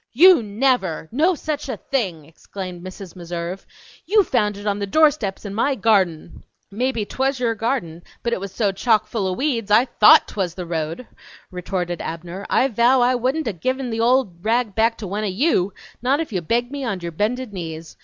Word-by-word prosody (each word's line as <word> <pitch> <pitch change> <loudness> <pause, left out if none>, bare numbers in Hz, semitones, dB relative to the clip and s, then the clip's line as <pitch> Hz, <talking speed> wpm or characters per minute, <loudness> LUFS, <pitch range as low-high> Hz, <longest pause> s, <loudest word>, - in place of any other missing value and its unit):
"You 345 +3 +7
never, 210 -6 0
no 325 +9 +2
such 300 -2 -4
a 245 - -3
thing!" 185 - -3
exclaimed 180 +2 -9
Mrs. 185 -1 -9
Meserve. 175 +1 -6 0.4
"You 415 +2 +5
found 210 - 0
it 205 - -9
on 205 -1 0
the 200 - -2
doorsteps 280 -7 +2
in 200 - -5
my 265 +6 +1
garden!" 190 -9 +1 0.3
"Mebbe 230 0 -1
twas 265 0 -1
your 235 -2 +1
garden, 210 -8 -2 0.2
but 235 - 0
it - - -1
was 195 0 -6
so 205 -1 0
chock 215 +3 +2
full 210 -5 -2
o' 185 - -1
weeks 235 -3 -1
I 220 +4 +5
THOUGHT 215 -4 +6
twas 180 -4 -3
the 180 - -5
road," 165 +6 -4 0.5
retorted 180 -1 -3
Abner. 170 +4 -6
"I 265 - +3
vow 245 +2 +3
I 245 +1 +4
wouldn't 260 +4 -1
a' 220 - -1
given 255 +8 -2
the 225 - -3
old 230 -7 +1
rag 225 -1 +1
back 225 +2 +2
to 210 - -6
one 205 +3 -3
o' - - 0
YOU, 200 - +1 0.3
not 265 +4 +2
if 320 -8 -4
you 185 - -1
begged 240 +8 -1
me 285 -1 -5
on 200 -7 -3
your 170 0 -5
bended 215 +6 -2
knees! 165 -3 -7
215 Hz, 200 wpm, -21 LUFS, 185-255 Hz, 0.5 s, You